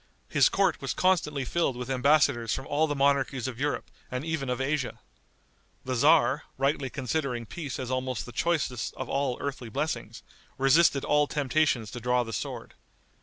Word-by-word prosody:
His - - +4
court - - +1
was - - -2
constantly 150 -7 +1
filled 165 -3 0
with 125 +1 -5
embassadors 135 -3 +3
from 135 - -6
all 155 +2 +1
the 145 - -2
monarchies 135 -2 +1
of 125 -2 -6
Europe 145 +1 -2 0.2
and 125 +3 -4
even 160 -5 -2
of 125 0 -1
Asia. 135 -1 -1 0.9
The 130 - -2
tzar, 145 +2 +4
rightly 135 0 0
considering 130 -2 -2
peace 145 +2 -6
as 130 -1 -4
almost 130 -5 -2
the - - -9
choicest 140 -6 -1
of - - -6
all 135 -2 0
earthly 135 -4 -4
blessings, - - -3 0.3
resisted 140 +1 +4
all 150 0 +3
temptations 140 -6 +1
to 120 - -6
draw 125 +1 +1
the 115 -1 -7
sword. - - -5
135 Hz, 170 wpm, -28 LUFS, 125-150 Hz, 0.9 s, His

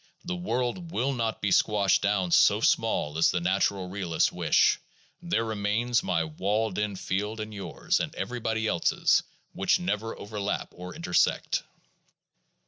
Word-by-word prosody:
The 180 +1 -2
world 165 +1 -2
will 135 -4 0
not 115 -3 -2
be 100 - +1
squashed 100 0 +3
down 95 -3 0
so - - +5
small 75 +2 +1
as 80 - +5
the 90 - 0
natural 95 +1 0
realists 90 -3 0
wish; - - +3 0.4
there 170 -10 0
remain 110 +3 -1
my 85 -3 0
walled 100 +7 -1
in 105 -1 -1
field 105 +4 -3
and 110 0 -5
yours 100 -2 -2
and - - -3
everybody 115 -2 -2
else's, 85 - +2 0.3
which - - +2
never 105 +5 -2
overlap 105 -1 -3
or 90 0 -9
intersect. 85 +1 +1
105 Hz, 140 wpm, -27 LUFS, 95-115 Hz, 0.4 s, so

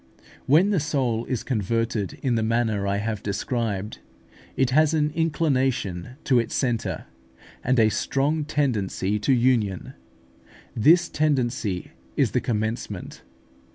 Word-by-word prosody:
When 165 +10 +5
the 195 - +2
soul 130 -7 -1
is 130 -4 -3
converted 115 -3 -1
in 130 -3 +1
the 115 - +1
manner 110 -3 0
I 100 0 0
have 105 0 -3
described, 105 0 -3 0.6
it 130 -1 +2
has 155 +3 +4
an 150 -1 +1
inclination 130 - 0
to 130 -3 +3
its 115 - -2
centre, 120 -4 -1 0.6
and 125 0 +2
a 110 -1 +5
strong 145 +7 0
tendency 105 -9 -1
to 105 - +1
union: 120 -7 +1 0.8
this 165 +9 +5
tendency 125 - -1 0.3
is - - +2
the - - +1
commencement. 110 -3 -3
120 Hz, 125 wpm, -24 LUFS, 105-140 Hz, 0.8 s, When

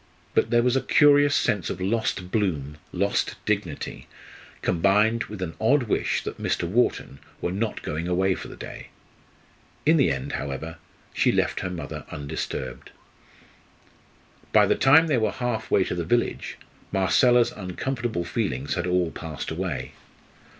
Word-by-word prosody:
But - - +2
there 120 0 +3
was 125 +1 +2
a 135 - +2
curious 145 -1 +5
sense 100 -6 +1
of - - -4
lost 95 -2 -1
bloom, 75 -9 -1
lost 100 +2 0
dignity, 100 -8 -3 0.6
combined 105 +6 +3
with 105 -3 -6
an 80 -3 -4
odd 130 +5 +4
wish 110 - 0
that - - -6
Mr. 85 - 0
Wharton 95 - 0 0.2
were 85 - -2
not 105 +4 -2
going 80 +3 -3
away 95 +2 +2
for - - -7
the - - -10
day. - - -9 1.0
In 160 +2 +5
the 135 - +4
end, 140 +3 -3
however, 80 - -4 0.4
she - - +3
left - - 0
her 90 - -3
mother 90 -2 -6
undisturbed. 75 +2 -5 1.6
By - - +6
the - - +3
time 145 +5 +6
they 145 -6 +2
were 110 -2 0
half 120 -3 -3
way 95 - +4
to - - -3
the 90 -1 -2
village, 120 +8 -1 0.3
Marcella's 120 +5 +4
uncomfortable 110 +1 -3
feelings 130 +5 -2
had 90 -2 -2
all 90 -2 +1
passed 80 -3 -6
away. - - -3
100 Hz, 150 wpm, -25 LUFS, 90-120 Hz, 1.6 s, By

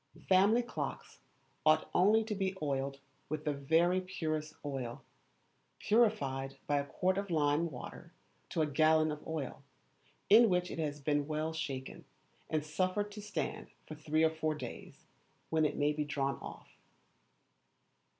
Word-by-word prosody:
Family 200 +6 +5
clocks 240 - -5 0.4
ought 155 0 +4
only 210 +5 +5
to 220 0 -3
be 190 -1 -1
oiled 140 -2 -2 0.3
with 155 +1 -3
the 150 - +1
very 165 +6 +2
purest 155 -4 -3
oil, 130 -4 -4 0.7
purified 135 - +1
by 145 -1 +2
a 140 - -2
quart 185 +6 0
of 200 0 -5
lime 155 0 +2
water 125 -5 -9 0.4
to 160 - +1
a - - +3
gallon 155 +1 +3
of 150 0 -5
oil, 155 -5 -4 0.7
in 225 +2 +8
which 180 -1 +1
it - - -5
has 150 -2 -2
been 145 0 0
well 155 +1 -2
shaken, 135 -4 -5 0.5
and 155 -1 0
suffered 185 +6 -1
to 210 +1 -8
stand 210 0 -4 0.2
for - - -7
three 155 +1 0
or 160 - +4
four 155 -1 -1
days, 150 - -9 0.5
when 160 -1 +3
it 150 - -1
may 145 +1 +2
be 150 0 -1
drawn 140 -2 -1
off. - - -9
155 Hz, 150 wpm, -33 LUFS, 145-185 Hz, 0.7 s, in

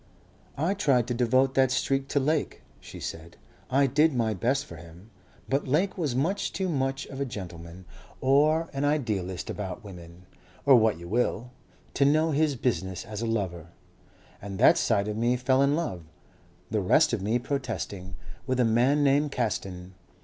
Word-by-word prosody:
"I 165 +7 +1
tried 140 - +2
to - - 0
devote 130 +2 +2
that 135 -1 +3
streak 135 +2 0
to 140 - +1
Lake," 150 +2 -1 0.2
she - - -11
said. 80 +1 -7 0.3
"I 140 +2 +3
did 150 +3 +3
my 115 -3 +1
best 130 +8 0
for 85 - -11
him. 85 +6 -14 0.4
But 135 +1 -1
Lake 165 +9 +1
was 150 -9 -2
much 175 +10 0
too 190 -1 -2
much 135 -3 -1
of 135 0 -7
a - - +2
gentleman 90 -5 -9 0.3
or 150 +5 +3
an 135 +1 -2
idealist 110 - -1
about 105 +3 -6
women, 90 -2 -12 0.4
or 140 -2 +7
what 110 -6 +3
you 85 +1 -10
will, 120 +3 -1 0.4
to 140 - +2
know 155 +3 +3
his 150 -1 +1
business 95 -7 -2
as 105 0 -6
a 115 - -2
lover. 95 -7 -2 0.7
And 100 -1 -6
that 135 - +5
side 105 -3 +1
of 105 0 -3
me 120 +2 +2
fell 130 +2 +2
in 140 +1 +3
love, 150 - -3 0.7
the - - +1
rest - - +3
of - - -1
me 110 +5 +1
protesting, 110 - -4 0.3
with 130 -1 0
a 125 - +4
man 125 +6 +3
named 145 +1 +2
Caston. 95 -7 -3
125 Hz, 175 wpm, -27 LUFS, 100-140 Hz, 0.7 s, or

